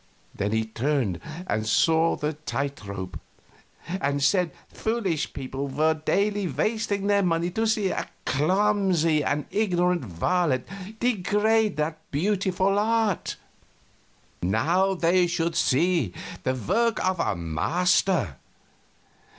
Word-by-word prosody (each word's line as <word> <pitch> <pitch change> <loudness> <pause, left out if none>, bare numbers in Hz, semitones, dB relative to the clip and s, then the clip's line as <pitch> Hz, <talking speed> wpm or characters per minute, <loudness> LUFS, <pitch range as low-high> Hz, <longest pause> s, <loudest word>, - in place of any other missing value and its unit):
Then 100 +1 -2
he 110 0 +1
turned 115 - -1 0.3
and 110 -10 -1
saw 160 +8 +3
the 150 +1 -2
tight 140 -3 -4
rope, 95 -2 -6 0.7
and 145 -6 -1
said 180 +1 +3 0.2
foolish 220 -9 -2
people 135 +1 -5
were 155 +4 +2
daily 200 +5 0
wasting 200 - -1
their 200 0 +3
money 170 -1 0
to 225 +5 0
see 215 -3 +1
a - - -3 0.2
clumsy 180 -1 +2
and 145 +1 -1
ignorant 180 -5 +1
varlet 130 - 0 0.3
degrade 215 -2 +2
that 155 +1 -1
beautiful 190 +4 +1
art; 220 -3 0 1.1
now 170 - +2
they 175 +1 +3
should 170 -1 -1
see 150 - +2 0.3
the 130 - 0
work 220 - +1
of 185 -2 0
a - - 0
master. 105 - +1
170 Hz, 115 wpm, -25 LUFS, 140-195 Hz, 1.1 s, saw